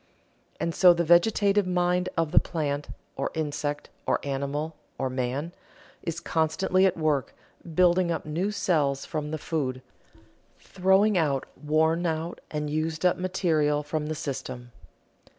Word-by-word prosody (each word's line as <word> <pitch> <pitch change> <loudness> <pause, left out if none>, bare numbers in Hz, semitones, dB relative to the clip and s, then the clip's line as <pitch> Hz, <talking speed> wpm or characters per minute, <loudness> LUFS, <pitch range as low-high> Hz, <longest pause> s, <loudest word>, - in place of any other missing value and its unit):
And 170 - -1
so 180 0 +6
the 170 - +1
vegetative 200 +3 +4
mind 180 0 +1
of 165 -2 +1
the - - +6
plant, 145 -3 -3 0.3
or - - -2
insect, 145 -1 -3 0.2
or - - +2
animal, 140 +3 -3 0.2
or 130 -1 -2
man, 130 +6 -2 0.5
is 165 0 -4
constantly 175 +3 +2
at 185 - -1
work 155 -4 0 0.4
building 180 0 +4
up 165 - -2
new 165 +6 -1
cells 150 -9 0
from 150 -1 -4
the 155 - -3
food, 135 -5 -3 0.7
throwing 190 +1 +2
out 140 -5 0
worn 160 +3 +1
out 160 +1 -3
and 150 -1 -3
used 155 +2 -2
up 180 - +4
material 160 -5 +1
from 150 +1 -3
the 155 - -2
system. 130 -4 -5
160 Hz, 140 wpm, -27 LUFS, 145-175 Hz, 0.7 s, so